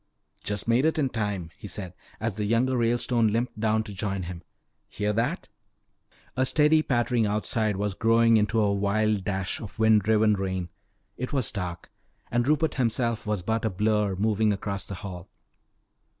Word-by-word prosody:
"Just 105 0 -3
made 120 +3 +3
it 160 +1 +2
in 140 -4 +1
time," 105 -8 -3
he - - -9
said 95 -3 -6 0.3
as 115 -1 -1
the 105 +1 -3
younger 120 +4 +2
Ralestone 120 0 +2
limped 115 +1 -1
down 110 0 +1
to 105 -2 -8
join 95 0 -3
him. 85 -1 -7 0.5
"Hear 105 0 -1
that?" 115 +3 -1 0.9
A 130 - +2
steady 150 +3 +4
pattering 120 -5 +1
outside 105 0 0
was 100 +1 -1
growing 115 +2 +4
into 110 +1 +1
a 105 -2 +3
wild 100 +1 +1
dash 95 -1 -2
of 110 -1 -9
wind 110 -1 +5
driven 110 +1 +3
rain. 95 -3 -2 0.5
It 125 - -4
was 130 -6 -1
dark 90 -3 -5 0.4
and 120 +1 +1
Rupert 155 +2 +2
himself 115 -1 0
was 105 -4 -1
but 110 +4 -1
a 110 - +1
blur 105 0 +1
moving 105 +2 +2
across 100 0 -3
the 100 - -5
hall. 90 -2 -8
110 Hz, 170 wpm, -26 LUFS, 100-115 Hz, 0.9 s, wind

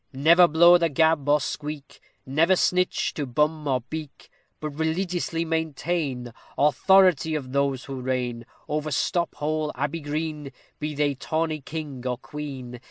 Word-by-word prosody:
Never 165 +6 +6
blow 170 +2 +6
the 170 -1 +2
gab, 160 -1 +2
or 150 +1 +5
squeak; 150 +1 -6 0.3
Never 160 +7 +3
snitch 180 0 +1
to 145 -3 -4
bum 150 +4 0
or 130 -2 +1
beak; 150 +4 -8 0.3
But 155 -1 -4
religiously 165 +2 -1
maintain 160 -5 -2 0.2
Authority 160 +1 +4
of 130 -4 -5
those 140 -1 0
who 135 -2 -6
reign 125 -2 -3 0.2
Over 150 +1 -2
Stop 170 +4 0
Hole 155 0 -1
Abbey 145 +5 -2
Green, 150 -1 -4 0.3
Be 150 0 -3
they 145 0 +1
tawny 155 +2 -2
king, 145 -3 -6
or 125 -1 -1
queen. 135 -4 -7
150 Hz, 145 wpm, -25 LUFS, 135-160 Hz, 0.3 s, Never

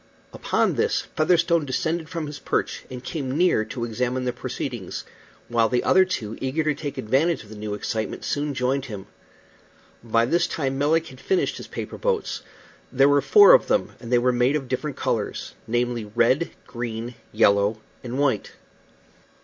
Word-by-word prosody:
Upon - - +1
this - - +1
Featherstone 170 +1 +3
descended 160 +4 -2
from 165 -3 -3
his 145 -1 -7
perch, - - -2
and 125 -1 -8
came 140 -3 -3
near 175 -10 +3
to 120 +1 -4
examine 125 +2 -2
the 125 - -1
proceedings, - - -5 0.4
while 115 -2 +2
the 125 -1 +1
other 190 0 +5
two, 115 - -4
eager 135 +5 0
to 150 0 +1
take 145 0 -6
advantage 135 +6 +1
of 105 - -17
the 110 - -9
new 105 0 -4
excitement, 110 +1 -3
soon 145 -1 -1
joined 130 +2 0
him. 105 -6 -7 1.0
By 115 0 +2
this 170 +7 +2
time 135 -3 -2
Melick 160 +3 +2
had 130 - -13
finished 380 0 0
his - - -8
paper - - -6
boats. 485 -3 -1 0.5
There 135 +1 +5
were 145 0 +4
four 415 - +8
of - - +5
them, - - +1
and 120 -1 -9
they 125 - +5
were 125 +1 +3
made 125 +4 +2
of 140 -4 -2
different 135 +3 -3
colors, - - -2
namely, 120 -1 0
red, 120 +9 +2 0.2
green, 120 0 -5 0.2
yellow, 100 0 +3 0.3
and 125 +1 -4
white. 135 -7 0
130 Hz, 175 wpm, -24 LUFS, 115-155 Hz, 1.0 s, four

